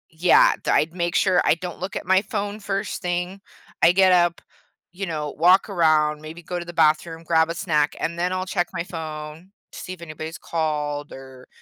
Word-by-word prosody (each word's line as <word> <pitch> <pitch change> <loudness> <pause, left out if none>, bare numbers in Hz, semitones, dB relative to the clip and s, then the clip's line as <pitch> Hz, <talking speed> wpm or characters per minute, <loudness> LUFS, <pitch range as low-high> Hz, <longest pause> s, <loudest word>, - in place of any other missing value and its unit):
yeah, 170 +2 +5
d - - -3
I'd 160 +2 +2
make 170 -1 -2
sure 185 -2 +3
I - - +3
don't 175 0 -7
look 185 +2 -5
at - - -4
my 190 +1 +4
phone 205 0 -4
first 200 0 -3
thing, 180 +2 -3 0.4
I 170 - +7
get 190 +1 +4
up, 175 -1 +3 0.5
you 195 +2 -5
know, 150 -3 -3
walk 180 +5 +4
around, 155 -4 +2
maybe 160 +3 -10
go 175 +2 -4
to 175 - -7
the 175 - -7
bathroom, 160 +1 +1
grab 160 0 +2
a 170 - -3
snack, 155 -5 0
and 170 +1 -3
then 180 +1 0
I'll 185 0 -2
check 180 -2 -1
my 170 -2 -2
phone 160 0 -8 0.2
to - - -10
see 185 - -6
if 175 - -13
anybody's 155 0 -7
called 150 -2 -3
or, 130 -1 -12
170 Hz, 205 wpm, -23 LUFS, 155-185 Hz, 0.5 s, I